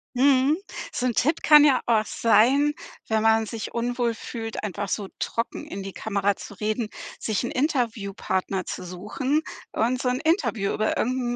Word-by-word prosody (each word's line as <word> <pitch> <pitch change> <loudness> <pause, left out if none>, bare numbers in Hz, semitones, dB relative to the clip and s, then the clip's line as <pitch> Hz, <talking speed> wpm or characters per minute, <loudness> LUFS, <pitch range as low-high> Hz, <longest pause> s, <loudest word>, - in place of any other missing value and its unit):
Mhm. 275 +3 +4 0.3
So 250 - -2
'n 245 - +1
Tipp 300 +8 +1
kann 300 -1 +8
ja 280 -3 +4
auch 220 -2 +3
sein, 270 +8 +3 0.3
wenn 220 0 +1
man 225 0 +4
sich 225 0 -6
unwohl 240 0 0
fühlt, 225 0 -6
einfach 200 -1 -3
so 205 -2 -2
trocken 230 - -3
in 195 0 -6
die 195 -1 -7
Kamera 200 -2 0
zu 205 - -10
reden, 215 +1 -1 0.3
sich 215 -1 -1
'n - - -3
Interviewpartner 210 - -1
zu - - -5
suchen 210 - -2 0.3
und 250 +3 0
so 250 - +1
'n 250 - 0
Interview 315 - +1
über 215 - 0
irgend 245 -1 0
230 Hz, 170 wpm, -25 LUFS, 210-255 Hz, 0.3 s, kann